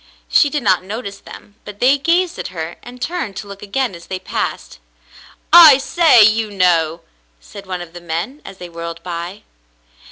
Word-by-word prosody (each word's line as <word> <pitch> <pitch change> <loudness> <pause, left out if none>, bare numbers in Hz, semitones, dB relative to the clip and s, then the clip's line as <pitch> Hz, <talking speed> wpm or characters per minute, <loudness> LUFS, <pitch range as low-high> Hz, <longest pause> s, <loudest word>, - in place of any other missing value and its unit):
She 290 - +3
did 295 0 -3
not 185 -1 +3
notice 200 +1 -7
them, 205 +1 -14
but 205 -1 -11
they 270 +3 +3
gazed 345 +4 0
at - - -4
her 165 -1 -7
and 245 +1 -12
turned 325 - -4
to 205 - -7
look 200 0 -11
again 240 +3 -2
as 170 -1 -12
they 190 - -4
passed. 185 - -5 0.7
"I 325 -5 +10
say, 275 -4 +4
you 215 +1 +2
know! 170 -4 +1 0.2
" - - -41
said 200 - -13
one 180 -1 -4
of 170 -1 -10
the 175 - -10
men, 170 - -5
as 195 - -11
they 180 - -9
whirled 170 0 -8
by. 175 +3 -6
200 Hz, 190 wpm, -17 LUFS, 175-255 Hz, 0.7 s, I